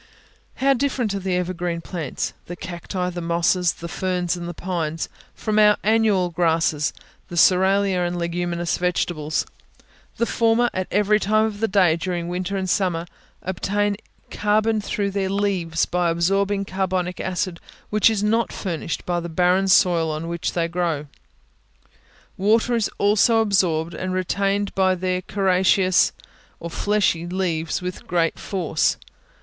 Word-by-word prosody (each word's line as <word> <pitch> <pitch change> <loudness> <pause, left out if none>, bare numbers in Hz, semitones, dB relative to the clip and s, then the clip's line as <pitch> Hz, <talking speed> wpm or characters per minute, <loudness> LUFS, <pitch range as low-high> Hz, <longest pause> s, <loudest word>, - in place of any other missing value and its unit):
How 275 +1 +3
different 255 -5 -1
are 200 - -2
the 190 -1 -1
evergreen 180 -1 -2
plants, 165 -6 -4
the 175 - -6
cacti, 180 +1 -4
the 175 0 -5
mosses, 170 +1 +1
the 170 - -8
ferns, 180 0 -1
and 175 -1 -6
the - - -5
pines, 165 -3 -3 0.3
from 215 -1 0
our 210 0 +6
annual 210 -4 +2
grasses, 160 -3 +1 0.4
the 175 - -8
cerealia 190 +2 +4
and 175 0 -3
leguminous 170 0 -2
vegetables! 170 -4 -1 0.7
The 235 - +1
former, 230 +1 +2
at 185 0 -2
every 210 +1 +3
time 215 +2 +2
of 210 -2 -4
the 225 - +1
day 185 -5 +3
during 175 0 -3
winter 185 +2 -2
and 190 -1 -2
summer, 175 -3 0 0.4
obtain 205 +3 -1 0.4
carbon 215 +1 +1
through 200 -1 -2
their 195 -1 -1
leaves 190 -5 0
by 180 -1 0
absorbing 195 +4 +1
carbonic 185 -2 -2
acid 185 -2 -2 0.3
which 215 +1 +5
is 210 -2 -1
not 225 +2 +1
furnished 165 -4 -4
by 175 -1 0
the 170 0 -5
barren 180 +3 +2
soil 175 -3 +4
on 155 +2 -4
which 170 0 -3
they 170 -1 0
grow; 170 -4 -1 1.3
water 220 +5 +2
is 225 -3 +1
also 215 +3 +4
absorbed 180 -6 +1
and 185 +3 -3
retained 195 +2 0
by 190 -1 +2
their 185 0 -1
coriaceous 185 -1 +3 0.5
or 170 - -6
fleshy 200 -4 +1
leaves 175 -2 -2
with 180 0 -6
great 170 -2 0
force. 175 -5 0
185 Hz, 145 wpm, -22 LUFS, 170-200 Hz, 1.3 s, our